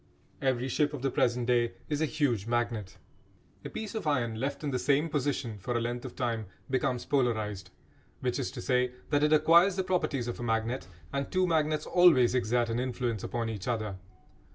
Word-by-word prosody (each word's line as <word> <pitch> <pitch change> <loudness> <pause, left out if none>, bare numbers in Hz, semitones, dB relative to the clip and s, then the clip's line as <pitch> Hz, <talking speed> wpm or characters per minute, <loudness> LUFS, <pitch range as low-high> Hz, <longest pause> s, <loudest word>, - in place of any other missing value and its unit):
Every 130 -2 +1
ship 145 +3 +1
of 135 - -8
the 135 - +1
present 120 0 +1
day 120 -1 +2
is 150 -1 -1
a 160 - +2
huge 120 -9 0
magnet. 115 -4 -1 0.7
A - - -5
piece 220 -2 -5
of 220 -8 -3
iron 120 -6 0
left 140 +4 -3
in 145 - -1
the 130 - 0
same 145 +5 +2
position 135 -7 -2
for 120 +5 -2
a - - +1
length 120 +1 -3
of - - -7
time 115 -4 -2 0.2
becomes 130 -1 0
polarised, 110 -7 0 0.5
which 125 +1 -1
is 130 - -1
to - - -6
say 125 -1 +1 0.2
that 145 -1 +3
it 150 0 +3
acquires 170 +5 +6
the 190 - 0
properties 165 -9 0
of 120 - -4
a - - -4
magnet; 115 +1 -1 0.3
and 140 0 -2
two 185 0 +2
magnets 155 -3 +1
always 160 -10 +5
exert 120 -1 +1
an 115 +1 -1
influence 125 -4 -2
upon 115 -1 -2
each 105 -4 -5
other. 110 -5 -2
125 Hz, 200 wpm, -30 LUFS, 120-145 Hz, 0.7 s, acquires